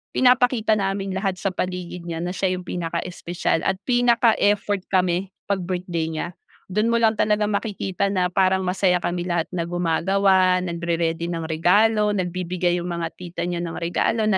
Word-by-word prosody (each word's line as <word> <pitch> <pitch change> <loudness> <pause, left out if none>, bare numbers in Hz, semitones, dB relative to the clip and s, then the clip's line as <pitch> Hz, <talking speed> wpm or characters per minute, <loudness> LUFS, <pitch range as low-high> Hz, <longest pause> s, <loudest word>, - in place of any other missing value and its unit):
Pinapakita 245 -3 +4
namin 195 0 -2
lahat 190 -1 -1
sa 195 - -1
paligid 180 -1 -4
niya 165 -1 -4
na 180 - -2
siya 185 -1 0
yung 180 - -8
pinaka-espesyal 170 0 -2
at 190 - +2
pinaka-effort 225 -5 +2
kami 185 0 +1 0.2
pag 200 - +1
birthday 175 -2 -2
niya. 160 +2 -3 0.4
Do'n 210 +4 +1
mo 235 - +3
lang 220 -1 +3
talaga 210 0 +2
makikita 200 -2 -1
na 180 -2 +1
parang 190 0 +2
masaya 180 0 +2
kami 175 0 -2
lahat 170 -2 0
na 170 -2 -1
gumagawa 185 +2 +2
nagre-ready 170 -1 -1
ng 165 -1 -3
regalo 210 +6 +3
nagbibigay 180 -1 -1
yung 175 - -5
mga 170 -1 -2
tita 175 -1 -7
niya 175 0 -2
ng 165 -1 -4
regalo 195 +6 0
na 190 - +3
185 Hz, 165 wpm, -23 LUFS, 175-200 Hz, 0.4 s, Pinapakita